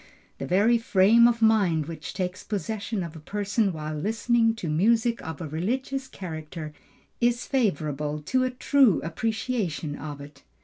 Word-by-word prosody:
The -, -, -4 dB
very 215 Hz, +6 st, +3 dB
frame 225 Hz, +2 st, +5 dB
of 235 Hz, -1 st, +1 dB
mind 195 Hz, -9 st, +3 dB
which 155 Hz, -2 st, -7 dB
takes 185 Hz, -1 st, -3 dB
possession 205 Hz, +1 st, -3 dB
of 165 Hz, -1 st, -7 dB
a -, -, -8 dB
person 205 Hz, +4 st, -1 dB
while 155 Hz, -2 st, -5 dB
listening 225 Hz, +7 st, +1 dB
to 205 Hz, -7 st, -5 dB
music 225 Hz, +9 st, +2 dB
of 160 Hz, -2 st, -7 dB
a 165 Hz, -, -4 dB
religious 260 Hz, -, -2 dB
character, 155 Hz, -4 st, -7 dB, 0.5 s
is 240 Hz, 0 st, +1 dB
favorable 150 Hz, -, -1 dB
to 255 Hz, +10 st, +1 dB
a 255 Hz, -, +1 dB
true 255 Hz, -, +3 dB
appreciation 200 Hz, -, -2 dB
of 145 Hz, -1 st, -7 dB
it. 140 Hz, 0 st, -12 dB
195 Hz, 150 wpm, -26 LUFS, 155-230 Hz, 0.5 s, frame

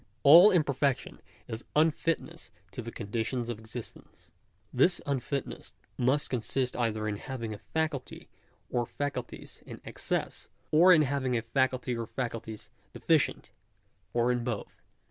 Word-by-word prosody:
All 170 Hz, +8 st, +10 dB
imperfection 140 Hz, -7 st, 0 dB, 0.3 s
is 110 Hz, +2 st, -6 dB
unfitness 165 Hz, +1 st, 0 dB, 0.2 s
to -, -, -6 dB
the 115 Hz, 0 st, -7 dB
conditions 115 Hz, +3 st, -3 dB
of 115 Hz, -3 st, -4 dB
existence. 110 Hz, +1 st, -10 dB, 0.4 s
This 175 Hz, +8 st, +3 dB
unfitness 140 Hz, 0 st, -3 dB, 0.2 s
must 130 Hz, +4 st, +1 dB
consist 125 Hz, +1 st, -1 dB
either 110 Hz, -3 st, -1 dB
in 105 Hz, -1 st, -2 dB
having 115 Hz, -3 st, -5 dB
a 105 Hz, -, -9 dB
faculty 155 Hz, -2 st, -3 dB, 0.4 s
or 120 Hz, -1 st, 0 dB
faculties 140 Hz, -4 st, -5 dB
in -, -, -10 dB
excess; -, -, -3 dB, 0.2 s
or 170 Hz, +4 st, +7 dB
in 160 Hz, -4 st, +7 dB
having 130 Hz, -3 st, 0 dB
a 115 Hz, -, -2 dB
faculty 130 Hz, +1 st, 0 dB
or 115 Hz, -1 st, -4 dB
faculties 115 Hz, -3 st, -5 dB, 0.2 s
deficient; -, -, +1 dB, 0.6 s
or 120 Hz, +1 st, +2 dB
in 120 Hz, -1 st, -1 dB
both. 115 Hz, -4 st, -5 dB
125 Hz, 130 wpm, -29 LUFS, 115-145 Hz, 0.6 s, All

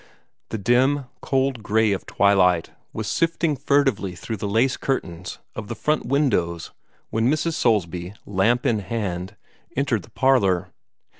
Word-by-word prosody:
The 110 Hz, -, -3 dB
dim, 130 Hz, +6 st, +2 dB, 0.2 s
cold 135 Hz, -3 st, 0 dB
gray 110 Hz, 0 st, +2 dB
of 100 Hz, -, -3 dB
twilight 90 Hz, -4 st, +3 dB, 0.2 s
was -, -, -4 dB
sifting 165 Hz, -2 st, +1 dB
furtively 135 Hz, -9 st, +1 dB
through 110 Hz, +4 st, -5 dB
the 105 Hz, +1 st, -3 dB
lace 120 Hz, +5 st, +2 dB
curtains 90 Hz, -10 st, -3 dB, 0.2 s
of 110 Hz, -2 st, -6 dB
the 120 Hz, -, -5 dB
front 150 Hz, +2 st, 0 dB
windows 100 Hz, -, 0 dB, 0.4 s
when 115 Hz, +2 st, +2 dB
Mrs. 155 Hz, +3 st, 0 dB
Soulsby, 90 Hz, -, 0 dB
lamp 105 Hz, +5 st, +1 dB
in 110 Hz, -3 st, +2 dB
hand, 95 Hz, -2 st, -4 dB, 0.4 s
entered 130 Hz, -6 st, +1 dB
the -, -, -16 dB
parlor. 100 Hz, -9 st, +2 dB
110 Hz, 140 wpm, -23 LUFS, 95-135 Hz, 0.4 s, twilight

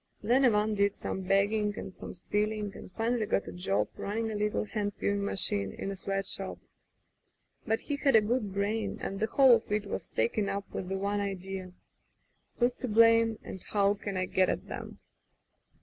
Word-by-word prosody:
Then 250 Hz, +5 st, +4 dB
Ivan 215 Hz, -2 st, +3 dB
did 200 Hz, -1 st, +2 dB
some 190 Hz, -, -4 dB
begging 205 Hz, +2 st, +1 dB
and 185 Hz, -, -6 dB
some -, -, -9 dB
stealing 210 Hz, +3 st, -1 dB
and -, -, -10 dB
finally 225 Hz, 0 st, 0 dB
got 200 Hz, -, 0 dB
a -, -, -5 dB
job 105 Hz, -, 0 dB
running 220 Hz, +2 st, -2 dB
a -, -, -4 dB
little 210 Hz, +1 st, 0 dB
hand 205 Hz, -1 st, -2 dB
sewing 200 Hz, 0 st, 0 dB
machine 100 Hz, -, +1 dB
in 195 Hz, -, -4 dB
a -, -, -4 dB
sweat 195 Hz, +1 st, -2 dB
shop. 190 Hz, 0 st, -2 dB, 1.1 s
But 225 Hz, 0 st, +1 dB
he 290 Hz, -, -3 dB
had 280 Hz, -3 st, +3 dB
a 220 Hz, -, +8 dB
good 215 Hz, -1 st, -1 dB
brain, 205 Hz, +2 st, -1 dB
and 195 Hz, -, -4 dB
the 220 Hz, -, +1 dB
whole 265 Hz, +1 st, +6 dB
of 230 Hz, -2 st, +1 dB
it 210 Hz, 0 st, 0 dB
was -, -, -4 dB
taken 200 Hz, -, 0 dB
up 200 Hz, 0 st, -3 dB
with 185 Hz, -, -4 dB
the 195 Hz, -, -1 dB
one 200 Hz, +1 st, -1 dB
idea: 190 Hz, -1 st, -5 dB, 0.8 s
"Who's 245 Hz, 0 st, +3 dB
to 255 Hz, -, -3 dB
blame, 230 Hz, 0 st, +5 dB
and 190 Hz, -, -8 dB
how 200 Hz, -1 st, +3 dB
can 200 Hz, -1 st, -5 dB
I 185 Hz, -, 0 dB
get 185 Hz, 0 st, +2 dB
at -, -, -2 dB
'em?" -, -, -6 dB
205 Hz, 195 wpm, -30 LUFS, 195-220 Hz, 1.1 s, a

